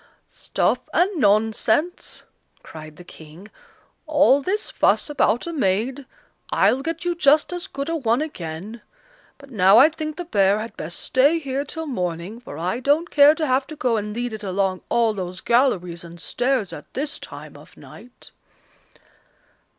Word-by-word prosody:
"Stuff - - -1 0.2
and 375 +3 +2
nonsense," 220 - +1 0.4
cried 155 -1 -11
the 180 - -13
King; 165 +4 -14 0.6
"all 295 -2 +4
this 400 +8 -2
fuss - - +1
about 240 -5 +1
a 340 - -5
maid! 255 +2 -1 0.4
I'll 265 - +3
get 330 +3 -4
you 350 - +1
just 305 0 +3
as 355 -1 -5
good 275 +1 -5
a 330 - -1
one 240 -5 +1
again. 210 - -6 0.6
But 280 -1 -16
now 195 -2 +5
I 275 +6 +8
think 310 -1 -6
the 355 - -6
bear 200 - +2
had 220 +2 -6
best 170 - -7
stay 280 +6 +3
here 275 -3 -3
till 320 +3 -6
morning, 180 - -4
for 235 -12 -10
I 180 +8 -2
don't 290 +6 +1
care 290 +1 +6
to 315 -1 -1
have 265 0 +1
to 310 - -8
go 250 -5 0
and 210 -1 -3
lead 240 -1 -3
it 215 - -6
along 190 -1 -1
all 230 -2 +2
those 185 -2 -5
galleries 185 -9 +1
and 170 0 -12
stairs 245 0 -1
at - - -11
this 285 +2 -3
time - - -10
of - - -16
night." 245 +1 -15
245 Hz, 165 wpm, -22 LUFS, 195-295 Hz, 0.6 s, I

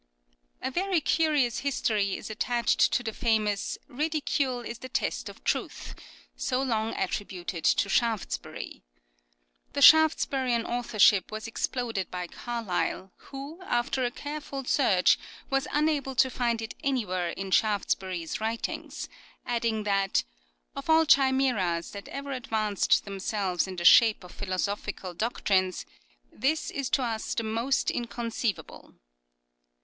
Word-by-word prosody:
A 260 - -1
very 370 +3 +1
curious 300 -6 +2
history 215 -8 0
is - - -7
attached 235 +1 +2
to 245 - +1
the 225 -2 -3
famous 215 -4 0
" - - -37
Ridicule 290 -5 0
is 235 -1 -7
the 255 - -8
test - - -2
of - - -13
truth," - - -2 0.4
so 255 -1 -1
long 225 -4 -1
attributed 185 -3 -3
to - - +3
Shaftesbury. 225 0 -2 0.9
The 280 - -2
Shaftesburian 270 -6 +5
authorship 215 -5 +3
was 215 +1 -5
exploded 225 -4 -2
by 180 -1 -4
Carlyle, 195 -3 -3 0.2
who 285 +6 -8
after 255 -4 0
a 245 - +1
careful 285 +1 -6
search 200 -10 +3 0.3
was 270 0 +1
unable 295 -3 0
to 260 +1 +3
find 235 -2 0
it 220 - -6
anywhere 185 -10 0
in 190 +2 -5
Shaftesbury's 190 -4 0
writings; 225 +1 -3 0.4
adding 230 -2 -1
that 195 -1 +1 0.3
" - - -45
of - - -7
all 320 0 +6
chimseras 260 - +2
that 200 -1 -8
ever 280 0 -6
advanced 220 -5 +1
themselves 195 -2 -1
in 190 - -6
the 175 -1 -4
shape 220 -2 +7
of 180 - -12
philo 190 -2 -4
sophical 200 -2 -3
doctrines, 190 -3 0 0.5
this 300 +7 -1
is 275 -2 -3
to 265 - +2
us 225 -2 -2
the 230 - -1
most 230 +5 0
incon 235 0 -3
ceivable." 225 -5 -4
230 Hz, 135 wpm, -28 LUFS, 200-265 Hz, 0.9 s, shape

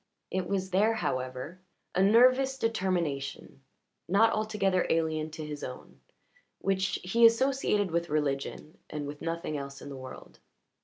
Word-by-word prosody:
It 185 -1 -1
was 190 -1 -1
there, 210 +5 +3
however 130 0 -3 0.3
a 185 - +2
nervous 255 +6 +5
determination, 175 - -2 0.5
not 225 +5 +4
altogether 210 -4 +1
alien 160 -1 0
to 155 0 -7
his 150 -1 -6
own, 125 - -8 0.6
which 190 0 0
he 230 +6 +1
associated 230 -5 +4
with 170 +1 -1
religion 150 +3 -2
and 150 -1 -4
with 145 +1 -7
nothing 165 -2 -3
else 140 0 -7
in - - -9
the 140 - -7
world. 130 0 -10
180 Hz, 140 wpm, -29 LUFS, 150-210 Hz, 0.6 s, nervous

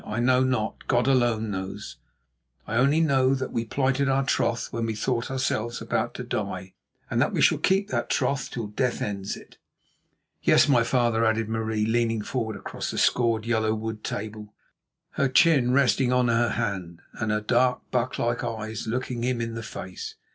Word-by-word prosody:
"I 110 - -4
know 125 +1 +4
not; 130 -4 -2
God 120 -1 +2
alone 120 -5 +2
knows. 95 +1 -6 0.7
I 115 - -2
only 140 +6 +4
know 135 -4 +3
that 130 -1 -4
we 115 - -2
plighted 135 +3 +1
our 135 0 +2
troth 120 -2 0
when 115 -1 -1
we 110 - -2
thought 115 +2 -1
ourselves 120 -3 -1
about - - -2
to - - -5
die, 95 0 -4 0.4
and - - +2
that - - +1
we - - -1
shall - - +4
keep 195 +2 +2
that - - -2
troth 140 -2 0
till 115 -3 -4
death 120 +4 -1
ends 100 -1 -3
it." - - -16 0.8
"Yes, - - +5
my 125 -5 +4
father," 120 -2 +1
added 110 -1 +1
Marie, 110 -1 -1
leaning 115 -1 +1
forward 110 -3 -3
across 100 - -5
the - - -4
scored 115 -3 +2
yellow 110 -2 +1
wood 110 0 -5
table, 105 0 -6 0.7
her 135 - +3
chin 135 -3 +4
resting 130 -1 +3
on 125 -1 +3
her 115 0 +2
hand 95 -8 -3
and 110 - -3
her 105 - +1
dark, 125 +3 +2
buck 125 0 0
like 120 0 -1
eyes 110 -2 -4
looking 125 0 -2
him 125 -1 0
in 115 -1 -3
the 115 - -5
face. 95 -4 -7
115 Hz, 185 wpm, -26 LUFS, 110-130 Hz, 0.8 s, Yes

